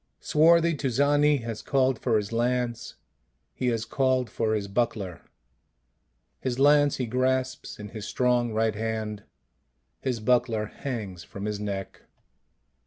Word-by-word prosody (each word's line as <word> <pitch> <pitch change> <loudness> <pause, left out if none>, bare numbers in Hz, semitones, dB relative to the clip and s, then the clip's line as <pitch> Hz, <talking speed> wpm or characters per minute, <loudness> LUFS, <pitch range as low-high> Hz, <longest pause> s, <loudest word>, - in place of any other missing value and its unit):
Swarthy 170 +2 +4
Tuzani 145 +1 +2
has 115 -2 -5
called 130 -3 +1
for 115 -3 +2
his 105 0 -3
lance, 120 0 -1 0.6
he 125 - -2
has 115 -2 0
called 130 -1 +1
for 110 -2 0
his 100 -2 -2
buckler; 100 -5 -2 1.2
his 125 -2 -2
lance 145 +1 +5
he 125 - -1
grasps 130 +2 -1
in 105 0 -8
his 110 0 -7
strong 125 -2 +1
right 110 0 +1
hand; 110 -1 -4 0.7
his 125 -3 -2
buckler 115 -1 +1
hangs 105 -7 -6
from 100 +1 -8
his 105 -1 -2
neck. 100 -2 -5
120 Hz, 130 wpm, -27 LUFS, 110-130 Hz, 1.2 s, lance